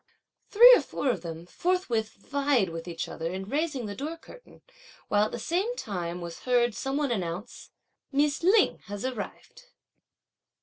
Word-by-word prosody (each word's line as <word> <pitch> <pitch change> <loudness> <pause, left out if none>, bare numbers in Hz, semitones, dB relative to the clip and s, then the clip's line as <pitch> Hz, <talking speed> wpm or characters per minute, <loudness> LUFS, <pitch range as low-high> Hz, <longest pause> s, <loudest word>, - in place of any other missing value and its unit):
Three 480 +4 +9
or - - +2
four 270 - -1
of 195 - -4
them 165 -1 -7
forthwith 240 - -1
vied 275 -2 0
with 165 +1 -7
each 170 -1 -4
other 165 +1 -4
in 190 +1 -5
raising 285 -1 -1
the 205 - -5
door 300 +10 -5
curtain, - - -16 0.5
while 205 0 +3
at - - -5
the - - -4
same 370 - -1
time 180 - -4
was 170 -1 -7
heard 245 -2 +2
some 270 +6 -3
one 290 -3 0
announce: 185 +1 -4 0.4
"Miss 290 +1 +1
Lin 390 +4 +4
has 205 +3 -5
arrived." 255 - -6
240 Hz, 165 wpm, -28 LUFS, 190-300 Hz, 0.5 s, Three